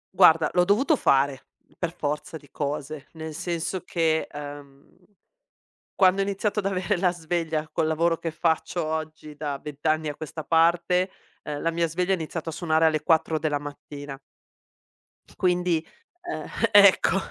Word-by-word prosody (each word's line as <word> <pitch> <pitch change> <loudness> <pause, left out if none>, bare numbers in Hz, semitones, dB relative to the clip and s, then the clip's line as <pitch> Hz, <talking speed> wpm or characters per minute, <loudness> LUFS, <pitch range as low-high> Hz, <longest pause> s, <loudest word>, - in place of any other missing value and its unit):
Guarda, 165 -4 +6
l'ho 180 - +4
dovuto 225 - +3
fare 135 - +1 0.3
per 175 -2 -3
forza 150 0 -4
di 145 -3 -19
cose, 145 0 -4
nel 160 -1 -7
senso 175 +3 -3
che, 160 -2 0
ehm, 145 -1 -10 1.1
quando 190 0 +4
ho - - +3
iniziato 200 +2 -1
ad 195 - -1
avere 190 -2 0
la 180 0 +2
sveglia 160 -2 -2
col 160 - +1
lavoro 165 +1 +1
che 165 - -3
faccio 160 +1 -1
oggi 155 -1 -5
da 145 -2 -3
20 145 0 -10
anni 155 0 +1
a 145 - -5
questa 155 +1 -7
parte, 170 +4 +3 0.3
ehm, 145 -1 -5
la 165 - 0
mia 170 0 0
sveglia 180 +4 -1
ha - - +4
iniziato 165 -1 -5
a - - -3
suonare 160 -1 +1
alle 155 -1 +2
4 160 -1 +2
della 150 -2 0
mattina. 145 -1 -8 1.2
Quindi, 180 -3 +1 0.5
ehm, - - -5 0.3
ecco, 200 -1 +6
160 Hz, 155 wpm, -25 LUFS, 150-175 Hz, 1.2 s, Guarda